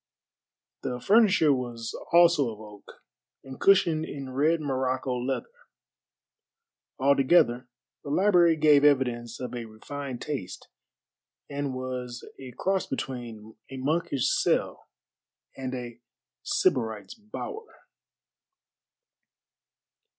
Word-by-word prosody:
The 125 -1 -4
furniture 200 - +4
was 120 -3 -4 0.2
also 170 -6 +5
of 110 -2 -9
oak, 105 -2 -14 0.4
and 135 -1 -11
cushioned 170 -5 +4
in 140 -4 -7
red 155 +5 +2
Morocco 130 -2 -1
leather. 125 +2 -2 1.5
Altogether 130 -2 +3 0.4
the - - -7
library 175 0 +4
gave 150 -2 +5
evidence 125 -5 +1
of 125 - -5
a 120 -1 -5
refined 125 +4 -7
taste, 140 -11 -6 0.8
and 140 -2 -3
was 125 -1 -6
a 130 -1 -9
cross 190 0 0
between 120 -5 -6
a 135 - -7
monkish 140 -1 0
cell - - 0 0.7
and 130 -1 -5
a 120 -2 -7 0.4
sybarite's 110 - 0
bower. 340 - -9
130 Hz, 100 wpm, -27 LUFS, 125-155 Hz, 1.5 s, also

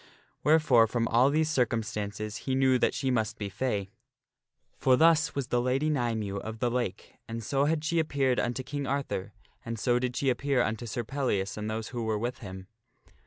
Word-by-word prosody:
Wherefore 145 -7 +5
from 115 0 0
all 120 +4 +5
these 155 +2 +2
circum 120 -7 +1
stances 105 -1 -4
he 130 - +2
knew 130 -1 +3
that - - +2
she 135 -2 0
must 110 -4 0
be 100 -2 -4
fay. 100 -2 -2 0.9
(For 130 - +5
thus 160 +1 +4
was 135 -2 -2
the 120 - +2
Lady 135 +5 +1
Nymue 115 -7 -1
of 110 +2 -6
the 120 +1 0
Lake; 120 -6 -3
and 115 0 -5
so 140 +4 +1
had 155 0 0
she 170 +1 +1
appeared 135 -5 +1
unto 125 +2 -1
King 140 +2 -4
Arthur, 135 -8 -2 0.3
and 115 0 -4
so 120 +2 +2
did 125 0 -2
she 135 -2 +2
appear 135 -1 +1
unto 110 +2 -3
Sir 120 +2 -3
Pellias 115 -6 -1
and 105 0 -4
those 110 0 -3
who 120 -1 -4
were 110 -1 0
with 120 +4 -3
him.) 95 -4 -8
120 Hz, 200 wpm, -29 LUFS, 110-135 Hz, 0.9 s, Wherefore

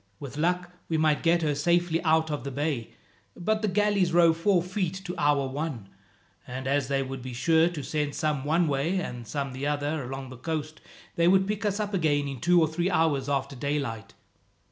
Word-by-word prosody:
With 140 -1 -8
luck 175 +3 0 0.2
we 160 - +1
might 155 -2 +2
get 170 0 +3
her 150 -2 +1
safely 170 +3 +1
out 160 -1 +2
of 145 -5 -3
the 140 - -4
bay, 140 -4 -2 0.5
but 215 +4 0
the 215 - +1
galleys 200 -2 +2
row 170 -1 +5
four 175 +2 +2
feet 185 -1 -2
to 180 - -4
our 145 -2 +2
one, 135 -7 -4 0.6
and 130 +1 -6
as 140 0 +1
they 135 0 0
would 135 0 -6
be 130 0 -7
sure 160 +5 +3
to 160 -5 -6
send 150 -1 -2
some 150 -3 -1
one 160 +4 +2
way, 145 +6 0
and 120 -9 -6
some 140 0 -3
the 135 +2 -3
other, 145 +1 -1
along 135 +1 -6
the 130 - -9
coast; 155 +3 -4 0.4
they 170 0 +4
would 190 +1 +4
pick 210 +1 -2
us 205 0 0
up 210 -1 -2
again 150 -6 +1
in 135 -2 -5
two 175 +4 +5
or 160 - +4
three 170 +4 -1
hours 155 -6 +1
after 140 0 -1
daylight." 135 -5 -3
155 Hz, 210 wpm, -27 LUFS, 140-175 Hz, 0.6 s, row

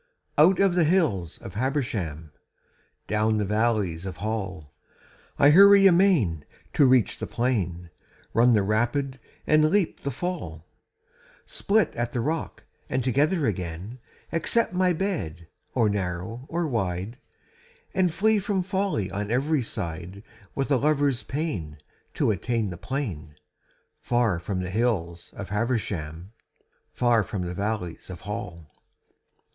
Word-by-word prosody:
Out 175 +5 +6
of 195 -2 +4
the 175 -1 +3
hills 150 - +1
of - - -8
Habersham, 105 - -2 0.7
Down 110 +1 +1
the 105 - 0
valleys 105 -5 0
of 95 - -6
Hall, 95 -8 -4 0.6
I 145 +1 +6
hurry 200 +3 +8
amain 170 - +4 0.3
to 140 - +5
reach 125 -3 +3
the - - -4
plain, 90 -9 -2 0.4
Run 120 +1 +5
the 105 - +3
rapid 120 +6 0 0.3
and 155 0 +4
leap 195 -1 +1
the 140 - -3
fall, 130 - -5 0.8
Split 205 -4 +1
at 120 0 -2
the 120 - -1
rock 155 +7 -3 0.3
and 130 - 0
together 145 +6 +2
again, 95 +3 -4 0.3
Accept 185 +7 +1
my 180 0 +3
bed, 155 - -3 0.3
or 115 -4 +3
narrow 100 +4 -3
or 170 +1 -1
wide, 105 - -2 0.7
And 185 -2 +2
flee 215 +5 +2
from 195 -1 -1
folly 190 - -1
on 105 +1 -3
every 140 +5 +1
side 95 -3 -6 0.3
With 135 +1 -2
a 135 - +5
lover's 145 -2 +1
pain 130 - -4 0.4
to - - +2
attain 115 -5 -1
the - - -6
plain 85 - -4 0.6
Far 120 -7 +1
from 95 +1 -3
the 90 0 -4
hills 95 -7 -1
of 100 -3 -7
Habersham, 100 -6 -2 0.6
Far 120 -2 +3
from 100 -2 -4
the 90 0 -4
valleys 100 -3 -4
of 90 -2 -8
Hall. 100 -7 -7
115 Hz, 135 wpm, -26 LUFS, 90-150 Hz, 0.8 s, hurry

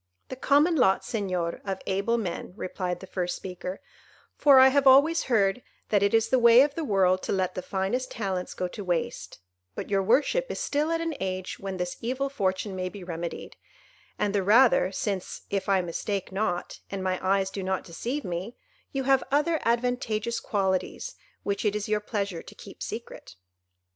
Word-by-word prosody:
"The - - -5
common 290 +6 +3
lot, 195 -8 +3
Señor, 185 -6 -2
of 195 -1 -3
able 200 +5 0
men," 180 -4 -4
replied 180 -2 -4
the - - -7
first 180 -1 -2
speaker, 185 0 -6 0.5
"for 280 -3 +6
I 260 0 +8
have 280 0 +3
always 290 +6 +6
heard 215 -2 +2 0.3
that 205 -2 +3
it 200 +2 +3
is 225 0 +2
the 260 - +3
way 235 +1 +8
of 290 0 -1
the 325 - -3
world 185 -6 +2
to - - -3
let 185 -1 0
the 185 - -4
finest 195 +8 -2
talents 190 -4 -3
go 180 - -2
to 205 - -7
waste; 175 - -3 0.3
but - - -6
your 195 -1 +3
worship 280 - +2
is - - -4
still 295 +2 0
at 330 0 0
an 330 -1 -2
age 185 -1 -4
when 195 -1 -5
this 180 0 -3
evil 260 +4 -1
fortune 195 -5 -1
may 185 0 -2
be 200 0 -10
remedied, 170 -1 -6 0.6
and 205 -1 0
the 200 - +2
rather 210 -1 +5
since, 195 -1 -3
if 200 0 -1
I 195 -1 +4
mistake 185 +3 -3
not, 190 -3 -2
and 195 -1 -4
my 185 -1 0
eyes 190 0 +1
do 195 - -4
not 190 0 -1
deceive 245 - -4
me, 180 +6 -4 0.4
you 270 -1 -2
have 270 0 +3
other 300 +3 +2
advantageous 235 -1 0
qualities 195 - -1 0.3
which 200 0 -2
it 210 -1 +1
is 210 -1 -2
your 210 0 +1
pleasure 200 -5 -3
to - - -13
keep - - -13
secret." - - -7
200 Hz, 190 wpm, -27 LUFS, 185-250 Hz, 0.6 s, I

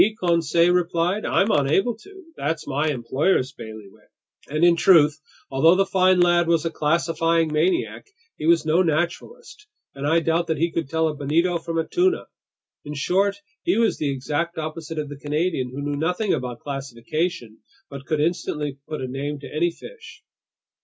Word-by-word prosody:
Conseil 170 0 +2
replied. 180 +3 0
"I'm 205 +3 +2
unable 155 - +2
to! 385 - -15
That's 155 +2 -3
my 145 +3 0
employer's 135 +2 0
bailiwick!" 110 -6 -12 0.4
And 155 +3 -1
in 175 -1 +6
truth, 155 -3 +5 0.3
although 160 +6 +5
the 195 +1 +3
fine 185 -1 +3
lad 175 -1 +4
was 165 -1 +2
a 165 - -1
classifying 165 0 +1
maniac, 165 - 0 0.3
he 155 - -4
was 165 -1 +4
no 160 +3 +3
naturalist, 185 - -3 0.3
and 140 +1 -4
I 165 +2 +4
doubt 165 +1 0
that 160 -1 -1
he 170 +3 0
could 165 -5 -3
tell 160 +1 +1
a 155 - -2
bonito 165 +5 0
from 165 0 -4
a 165 - -1
tuna. 370 +1 +1 0.6
In 150 0 -7
short, 195 +7 0 0.2
he 355 - +1
was 230 -1 +1
the 145 - 0
exact 145 +6 -2
opposite 160 0 -5
of 150 -1 -2
the 145 -1 -9
Canadian, 150 -2 -1
who 135 +3 -6
knew 145 0 -2
nothing 180 +6 0
about 125 -2 -4
classification 135 -2 -4 0.3
but 140 -1 -10
could 155 -2 0
instantly 150 -4 -2
put 155 - -5
a 130 - -3
name 140 +3 -4
to - - -10
any 170 +3 +2
fish. 455 - -13
160 Hz, 175 wpm, -23 LUFS, 145-175 Hz, 0.6 s, in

